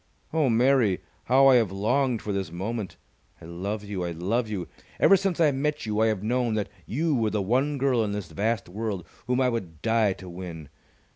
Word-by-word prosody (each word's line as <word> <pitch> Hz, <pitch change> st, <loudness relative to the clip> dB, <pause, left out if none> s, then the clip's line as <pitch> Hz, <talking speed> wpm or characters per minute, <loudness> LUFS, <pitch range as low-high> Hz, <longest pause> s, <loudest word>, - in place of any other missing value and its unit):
Oh, 155 Hz, -4 st, +2 dB
Mary, 120 Hz, -4 st, +3 dB, 0.3 s
how 135 Hz, +2 st, +5 dB
I 135 Hz, -2 st, +7 dB
have 110 Hz, -6 st, +1 dB
longed 120 Hz, +5 st, 0 dB
for 105 Hz, -, -2 dB
this 95 Hz, -4 st, -3 dB
moment! 100 Hz, +4 st, -4 dB, 0.4 s
I -, -, -12 dB
love 100 Hz, +5 st, -4 dB
you! 100 Hz, -3 st, -4 dB
I 85 Hz, -, -2 dB
love 100 Hz, +8 st, -1 dB
you! 95 Hz, -5 st, -4 dB, 0.3 s
Ever 195 Hz, -, +7 dB
since 195 Hz, -2 st, -1 dB
I 155 Hz, -3 st, +5 dB
met 150 Hz, +1 st, -1 dB
you 105 Hz, -1 st, -1 dB
I 110 Hz, -, +4 dB
have 105 Hz, -3 st, -1 dB
known 120 Hz, 0 st, 0 dB
that 105 Hz, -2 st, -2 dB, 0.2 s
you 155 Hz, +6 st, 0 dB
were 115 Hz, -5 st, +1 dB
the 105 Hz, 0 st, -1 dB
one 130 Hz, +9 st, +1 dB
girl 130 Hz, -4 st, +2 dB
in 105 Hz, -, -2 dB
this 100 Hz, -5 st, -5 dB
vast 110 Hz, +6 st, -1 dB
world 100 Hz, -1 st, -4 dB, 0.2 s
whom 125 Hz, +1 st, +1 dB
I 130 Hz, -1 st, +3 dB
would 90 Hz, -10 st, -5 dB
die 110 Hz, -3 st, +3 dB
to 95 Hz, -, -12 dB
win! 85 Hz, -4 st, -8 dB
110 Hz, 210 wpm, -26 LUFS, 95-125 Hz, 0.4 s, I